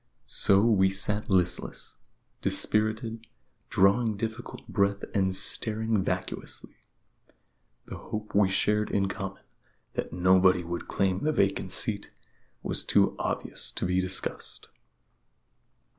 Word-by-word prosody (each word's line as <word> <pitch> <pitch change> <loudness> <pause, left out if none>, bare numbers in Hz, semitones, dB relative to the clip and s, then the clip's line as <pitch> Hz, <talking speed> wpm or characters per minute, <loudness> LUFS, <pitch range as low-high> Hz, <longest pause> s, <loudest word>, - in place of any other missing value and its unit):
So 100 0 +3
we 95 -5 +4
sat 105 +3 -1
listless, 90 -2 0 0.5
dispirited, 110 +1 +1 0.4
drawing 105 +3 +3
difficult 110 +1 -6
breath 100 0 0
and 95 -3 +1
staring 110 +1 0
vacuously. 90 -1 -4 1.1
The - - -8
hope 105 0 -6
we 100 -1 +4
shared 105 +2 +1
in 100 -1 +1
common 95 0 -6 0.5
that - - -3
nobody 90 +1 +4
would 85 0 -5
claim 95 -1 0
the 155 - +1
vacant 100 -7 +1
seat 100 +2 0 0.5
was - - -2
too - - +3
obvious - - -2
to - - -2
be 90 +1 +1
discussed. 95 +1 -2
100 Hz, 115 wpm, -28 LUFS, 95-110 Hz, 1.1 s, we